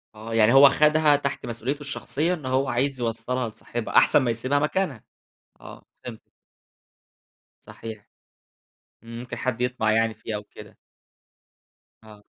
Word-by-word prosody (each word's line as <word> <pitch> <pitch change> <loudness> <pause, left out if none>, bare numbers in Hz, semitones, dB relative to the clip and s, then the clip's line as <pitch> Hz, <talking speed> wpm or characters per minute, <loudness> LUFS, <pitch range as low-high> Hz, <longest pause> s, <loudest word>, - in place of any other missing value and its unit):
آه، 110 +2 -8
يعني 115 +1 +4
هو 135 +1 +9
خَدها 150 +1 +4
تحت 140 -2 -3
مسؤوليته 120 +5 -4
الشخصية 145 +3 -1
إن 155 -6 -7
هو 130 +1 0
عايز 130 +2 -1
يوصّلها 120 +1 -2
لصاحبها 115 +1 -4
أحسن - - +6
ما 120 -3 0
يسيبها 130 +5 0
مكانها، 150 - -2 0.6
آه - - -13 0.2
فهِمتِك - - -10 1.3
صحيح. 110 -2 -10 1.0
ممكن 115 +2 -8
حد 130 -2 -3
يطمَع 125 -3 0
يعني 115 0 +1
فيها 105 -1 -5
كده. - - -14 1.3
آه. 105 -1 -16
125 Hz, 125 wpm, -24 LUFS, 115-140 Hz, 1.3 s, هو